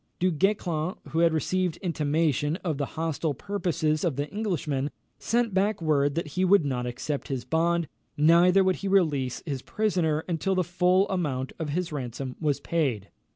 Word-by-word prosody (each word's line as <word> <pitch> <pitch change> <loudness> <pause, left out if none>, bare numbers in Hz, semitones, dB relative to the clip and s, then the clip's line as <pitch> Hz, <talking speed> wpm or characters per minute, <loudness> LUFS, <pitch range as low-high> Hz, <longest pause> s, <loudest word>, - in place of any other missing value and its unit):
Du 185 +1 +2
Guesclin, 175 -1 0
who 160 - -1
had 170 0 +5
received 180 +2 0
intimation 155 -3 0
of 160 -6 -2
the 140 - -1
hostile 160 -2 -1
purposes 165 -4 -1
of 165 -6 0
the 145 +2 -2
Englishman, 155 -10 -1 0.3
sent 230 -2 0
back 200 +2 +1
word 145 -3 +1
that 165 -2 -2
he 185 +6 -1
would 185 -3 +5
not 125 -3 -2
accept 130 +4 -4
his 130 -3 -3
bond, 165 +3 +1 0.3
neither 170 +5 +5
would 185 -1 +2
he 200 - -4
release 150 -10 +1
his 140 -5 -3
prisoner 170 -7 0
until 185 +3 0
the 185 - +2
full 180 +2 +2
amount 145 -9 -2
of 160 -2 -3
his 175 +3 -2
ransom 130 -2 -5
was 150 -3 +1
paid. 130 - -1
160 Hz, 170 wpm, -27 LUFS, 145-185 Hz, 0.3 s, had